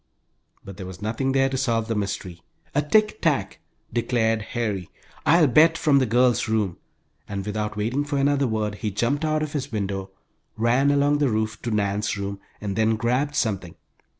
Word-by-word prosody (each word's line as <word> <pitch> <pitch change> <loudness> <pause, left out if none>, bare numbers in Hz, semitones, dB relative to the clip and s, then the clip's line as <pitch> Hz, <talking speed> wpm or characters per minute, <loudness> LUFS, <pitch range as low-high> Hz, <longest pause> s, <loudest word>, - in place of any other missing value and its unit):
But 100 -1 -9
there 95 -2 -7
was 95 0 -9
nothing 115 +6 -1
there 135 0 +3
to 135 0 -2
solve 115 -4 0
the 115 - -1
mystery. 95 -4 -4 0.3
"A 145 - +3
tick 215 +8 +2
tack!" 125 - 0 0.3
declared 115 -2 +1
Harry, 105 -7 -2 0.4
"I'll 165 +2 +6
bet, 155 +5 +5
from 145 -4 +4
the 130 - +1
girls' 120 +2 +3
room!" 105 -6 0 0.5
and 100 -1 -4
without 105 0 -3
waiting 120 +7 0
for 145 -1 -2
another 140 0 +2
word 110 -2 -1
he 110 - 0
jumped 120 +9 -1
out 155 0 +1
of 150 - -5
his 140 -3 -3
window, 100 -2 -3 0.5
ran 120 +5 +3
along 145 +1 +3
the 145 -3 +2
roof 110 -1 -2
to 120 - -3
Nan's 105 0 0
room, 100 0 -4 0.2
and 100 -2 -4
then 110 0 +2
grabbed 125 +6 0
something. 95 - -1
115 Hz, 180 wpm, -24 LUFS, 105-140 Hz, 0.5 s, I'll